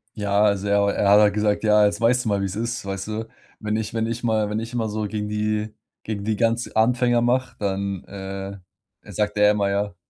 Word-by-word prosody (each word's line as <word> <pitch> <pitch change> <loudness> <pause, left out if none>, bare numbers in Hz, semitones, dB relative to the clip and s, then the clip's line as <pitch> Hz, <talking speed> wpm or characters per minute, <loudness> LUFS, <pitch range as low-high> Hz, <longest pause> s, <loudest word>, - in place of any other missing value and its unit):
Ja, 100 0 +1
also 100 -1 +1
er 100 0 +3
er 100 - +1
hat 105 - +8
halt 105 -1 +4
gesagt: 105 0 0
„Ja, 105 -1 +5
jetzt 100 +2 0
weißt 125 +2 +3
du 110 - 0
mal, 100 -1 +1
wie's 95 0 -3
ist”, 120 +2 -3
weißt 95 0 -4
du? 110 +1 -4 0.3
Wenn 110 0 -2
ich 110 0 -4
wenn 115 0 -1
ich 115 +1 -4
mal 110 -3 +1
wenn 105 +1 -2
ich 115 +2 -7
immer 115 -3 -1
so 110 +1 -3
gegen 105 0 -4
die 105 0 -2 0.3
gegen 100 -2 -4
die 110 0 0
ganz 115 +2 +1
Anfänger 120 +1 +2
mach, 120 0 +1
dann, 100 -2 -2
äh, 95 0 -7 0.5
sagt 105 0 -1
der 105 0 +5
immer, 100 -1 0
ja. 100 -1 -2
105 Hz, 225 wpm, -23 LUFS, 100-110 Hz, 0.5 s, hat